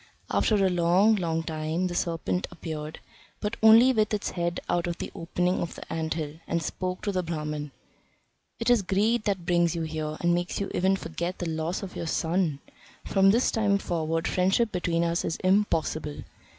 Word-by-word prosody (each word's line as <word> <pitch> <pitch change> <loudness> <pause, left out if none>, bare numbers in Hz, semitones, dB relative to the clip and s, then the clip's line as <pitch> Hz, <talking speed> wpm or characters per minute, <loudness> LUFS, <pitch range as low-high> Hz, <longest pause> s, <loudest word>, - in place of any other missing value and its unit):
After 215 - +2
a 195 -2 +3
long, 180 +5 +4
long 165 -3 -1
time 160 +2 -2
the 180 - -2
serpent 175 +1 -1
appeared, 155 -3 -6 0.4
but 210 +2 -2
only 225 +4 +7
with 215 -2 +2
its 205 - -3
head 175 -1 -2
out 175 0 0
of 170 - -3
the - - -5
opening 180 +2 -1
of 170 - -4
the - - -8
ant 160 -1 -2
hill, 155 -1 -5
and 170 -1 -1
spoke 185 +3 -4
to 205 - 0
the 185 -2 0
Brahman: 150 -3 -4 0.9
"'Tis 240 -2 +4
greed 210 +5 +1
that 195 -5 -1
brings 175 -1 +2
you 165 - -2
here, 155 -1 -4
and 175 0 +3
makes 175 0 -1
you 200 - -3
even 190 +2 +2
forget 170 0 -4
the 175 - -3
loss 160 +4 -2
of 190 - -7
your 170 - -4
son. 165 -2 0 0.5
From 195 -1 +4
this 235 +5 +3
time 205 -3 +2
forward 165 -3 -1
friendship 195 +5 +2
between 170 -2 0
us 170 +1 0
is 160 - -1
impossible. 165 -6 +1
175 Hz, 185 wpm, -27 LUFS, 165-195 Hz, 0.9 s, only